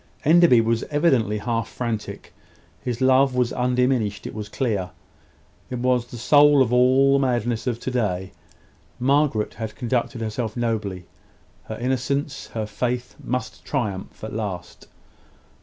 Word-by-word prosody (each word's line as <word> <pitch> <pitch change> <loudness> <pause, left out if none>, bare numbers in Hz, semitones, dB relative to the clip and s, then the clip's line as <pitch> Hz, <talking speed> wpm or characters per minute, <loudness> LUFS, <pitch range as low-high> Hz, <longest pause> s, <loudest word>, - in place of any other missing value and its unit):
Enderby 160 -6 +6
was 115 0 0
evidently 135 -9 +2
half 115 +1 -2
frantic. 115 -3 -5 0.5
His 125 0 -4
love 130 0 +4
was 125 -2 +1
undiminished, 125 -5 0
it - - -6
was 105 -1 -6
clear. 105 -8 -1 0.8
It 125 - -3
was 125 0 +1
the 120 - -9
soul 145 +3 +6
of 125 -1 -2
all 130 +2 +5
the 140 - +4
madness 120 -3 0
of 120 -2 -1
to 130 - -3
day. 95 -6 -1 0.7
Margaret 135 -4 +1
had 110 -2 -6
conducted 120 +1 -2
herself 110 +1 -3
nobly. 105 -6 -2 0.6
Her 110 - -6
innocence, 130 +3 -2
her 110 -1 -1
faith, 120 +3 -3
must 125 -2 -4
triumph 105 -11 -4
at 110 - -5
last. 95 -5 -5
120 Hz, 140 wpm, -23 LUFS, 110-130 Hz, 0.8 s, Enderby